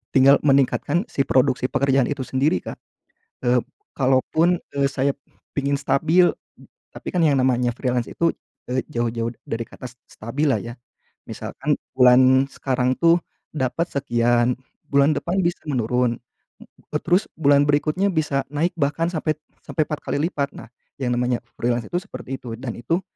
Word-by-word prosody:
tinggal 135 Hz, +1 st, +7 dB
meningkatkan 140 Hz, -, +2 dB
si 140 Hz, -, 0 dB
produksi 130 Hz, 0 st, +2 dB
pekerjaan 135 Hz, -2 st, +2 dB
itu 140 Hz, -2 st, -3 dB
sendiri 130 Hz, -, 0 dB
Kak. -, -, -7 dB, 0.7 s
Eee, 120 Hz, 0 st, +3 dB, 0.3 s
kalaupun, 145 Hz, +6 st, +2 dB, 0.2 s
eee, 140 Hz, -1 st, +2 dB
saya 140 Hz, +1 st, 0 dB, 0.4 s
pingin 140 Hz, 0 st, 0 dB
stabil, 165 Hz, +5 st, +3 dB, 0.6 s
tapi -, -, -7 dB
kan 180 Hz, -, +2 dB
yang 145 Hz, -3 st, +4 dB
namanya 125 Hz, -1 st, +2 dB
freelance 125 Hz, -2 st, -1 dB
itu, 170 Hz, -1 st, 0 dB, 0.4 s
eee, 130 Hz, +1 st, 0 dB
jauh-jauh 115 Hz, -3 st, -1 dB, 0.2 s
dari 115 Hz, +1 st, -3 dB
kata -, -, -11 dB
se 125 Hz, -, -25 dB
stabil 135 Hz, +8 st, -2 dB
lah -, -, +3 dB
ya. 120 Hz, 0 st, -7 dB, 0.6 s
Misalkan -, -, -3 dB, 0.2 s
bulan 130 Hz, +1 st, +6 dB
sekarang 130 Hz, -1 st, 0 dB
tuh 170 Hz, +1 st, +6 dB, 0.4 s
dapat 140 Hz, +5 st, -1 dB
sekian, 120 Hz, -2 st, +2 dB, 0.4 s
bulan 140 Hz, +2 st, +4 dB
depan 185 Hz, +3 st, -1 dB
bisa 170 Hz, -1 st, -1 dB
menurun, 125 Hz, -2 st, 0 dB, 0.4 s
eee, 150 Hz, -, -7 dB
terus 180 Hz, +4 st, +2 dB
bulan 145 Hz, -2 st, +4 dB
berikutnya 155 Hz, +7 st, +2 dB
bisa 150 Hz, -4 st, 0 dB
naik 165 Hz, +4 st, 0 dB
bahkan 150 Hz, +4 st, +1 dB
sampai 155 Hz, -1 st, 0 dB, 0.3 s
sampai 155 Hz, -, -1 dB
4 150 Hz, -, -3 dB
kali -, -, -1 dB
lipat. 140 Hz, -5 st, -3 dB
Nah, -, -, -10 dB, 0.3 s
yang 125 Hz, -, 0 dB
namanya 125 Hz, 0 st, 0 dB, 0.2 s
freelance 120 Hz, 0 st, -1 dB
itu 175 Hz, -, -1 dB
seperti 135 Hz, -6 st, -7 dB
itu, 120 Hz, -2 st, -7 dB
dan 125 Hz, -4 st, -4 dB
itu 165 Hz, +10 st, -1 dB
135 Hz, 155 wpm, -22 LUFS, 125-150 Hz, 0.7 s, tinggal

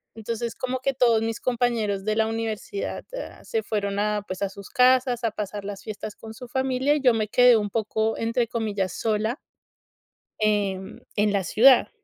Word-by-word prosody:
Entonces 230 Hz, +1 st, -4 dB
como 255 Hz, 0 st, -3 dB
que 275 Hz, +1 st, 0 dB
todos 235 Hz, -4 st, +3 dB
mis 225 Hz, 0 st, -2 dB
compañeros 230 Hz, -5 st, 0 dB
de 215 Hz, 0 st, +1 dB
la 220 Hz, 0 st, +3 dB
universidad 225 Hz, -, -4 dB
a -, -, -7 dB
se 450 Hz, -2 st, -2 dB
fueron 200 Hz, -2 st, -2 dB
a, 210 Hz, 0 st, 0 dB
pues, 185 Hz, -, -6 dB
a 200 Hz, -, 0 dB
sus 200 Hz, 0 st, -11 dB
casas 255 Hz, -1 st, +3 dB
a 230 Hz, -, +1 dB
pasar 205 Hz, -1 st, -5 dB
las 200 Hz, -1 st, -6 dB
fiestas 215 Hz, -1 st, -6 dB
con 220 Hz, 0 st, -10 dB
su 250 Hz, +2 st, -10 dB
familia 265 Hz, +2 st, +1 dB
y 300 Hz, -, -1 dB
yo 250 Hz, -3 st, +5 dB
me 215 Hz, -2 st, -1 dB
quedé 245 Hz, +2 st, +6 dB
un 210 Hz, -1 st, -1 dB
poco 220 Hz, 0 st, 0 dB
entre 230 Hz, +1 st, 0 dB
comillas 210 Hz, -5 st, -2 dB
sola 220 Hz, +4 st, 0 dB, 1.0 s
em, 200 Hz, -2 st, 0 dB, 0.2 s
en 205 Hz, 0 st, +2 dB
la 200 Hz, -1 st, +1 dB
ciudad. 245 Hz, +9 st, +5 dB
225 Hz, 185 wpm, -25 LUFS, 210-250 Hz, 1.0 s, quedé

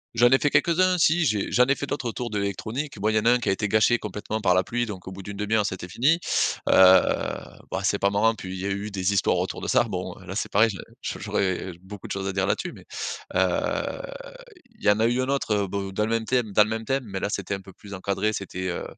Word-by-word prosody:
J'en 120 Hz, +1 st, +6 dB
ai 130 Hz, +1 st, +5 dB
fait 145 Hz, -, +2 dB
quelques-uns. 180 Hz, +4 st, +3 dB
Si 170 Hz, +1 st, +3 dB
j'ai 105 Hz, -7 st, 0 dB
j'en 125 Hz, -, +5 dB
ai 140 Hz, -, +3 dB
fait 140 Hz, -, -4 dB
d'autres 135 Hz, -3 st, -3 dB
autour 120 Hz, 0 st, -5 dB
de 105 Hz, -, -1 dB
l'électronique. 110 Hz, +6 st, -4 dB
Bon, 105 Hz, +2 st, +1 dB
il 110 Hz, -, 0 dB
y 110 Hz, -, +5 dB
en 105 Hz, -, -4 dB
a -, -, +6 dB
un 125 Hz, -, +5 dB
qui 120 Hz, -, -5 dB
a -, -, +4 dB
été 105 Hz, +2 st, -1 dB
gâché 110 Hz, +3 st, +3 dB
complètement 105 Hz, +1 st, -4 dB
par 90 Hz, -3 st, +3 dB
la 90 Hz, -, +3 dB
pluie, 120 Hz, +4 st, -2 dB
donc 95 Hz, -3 st, -8 dB
au -, -, -5 dB
bout 95 Hz, +1 st, -8 dB
d'une 100 Hz, +1 st, -8 dB
demi-heure, 105 Hz, 0 st, +1 dB
c'était 90 Hz, -2 st, -5 dB
fini, 145 Hz, -, +2 dB, 0.5 s
heu, -, -, +3 dB, 1.0 s
bah, 95 Hz, +1 st, -2 dB
c'est 100 Hz, 0 st, +1 dB
pas 100 Hz, -, +3 dB
marrant, 110 Hz, +3 st, +3 dB
puis 95 Hz, -3 st, -7 dB
il -, -, -6 dB
y 95 Hz, -, -4 dB
a 100 Hz, -, -1 dB
eu 100 Hz, +2 st, -3 dB
des 100 Hz, -1 st, -1 dB
histoires 95 Hz, -, +2 dB
autour -, -, -3 dB
de -, -, -4 dB
ça, -, -, +4 dB
bon, -, -, -5 dB
heu, -, -, -14 dB
là, -, -, -6 dB
c'est -, -, -2 dB
pareil 110 Hz, +3 st, +4 dB, 0.3 s
j'au -, -, -4 dB
j'aurais, 95 Hz, -2 st, -1 dB
heu, -, -, -7 dB
beaucoup 95 Hz, +1 st, -10 dB
de -, -, -9 dB
choses 95 Hz, 0 st, -3 dB
à 95 Hz, -, -2 dB
dire 95 Hz, 0 st, 0 dB
là-dessus 175 Hz, -, -1 dB
mais, -, -, -14 dB, 0.5 s
heu, -, -, 0 dB, 0.8 s
il -, -, -19 dB
y -, -, +6 dB
en 105 Hz, +1 st, +4 dB
a 115 Hz, -, +3 dB
eu 125 Hz, +2 st, +1 dB
un 130 Hz, -, -2 dB
autre, 140 Hz, -5 st, 0 dB
heu, -, -, -7 dB
bo 100 Hz, 0 st, -4 dB
dans 100 Hz, +2 st, -1 dB
le -, -, -4 dB
même 115 Hz, -1 st, 0 dB
thème 120 Hz, -3 st, 0 dB
dans 105 Hz, -, +7 dB
le 110 Hz, -, -4 dB
même 110 Hz, 0 st, -3 dB
thème 135 Hz, 0 st, 0 dB
mais 95 Hz, -2 st, -5 dB
là, -, -, -2 dB
c'était 100 Hz, -1 st, -3 dB
un 95 Hz, -, -4 dB
peu 95 Hz, -1 st, -14 dB
plus 100 Hz, -1 st, -12 dB
encadré, 100 Hz, +3 st, -1 dB
c'était, 95 Hz, -2 st, -4 dB
heu 85 Hz, -, -3 dB
105 Hz, 290 wpm, -25 LUFS, 95-120 Hz, 1.0 s, dans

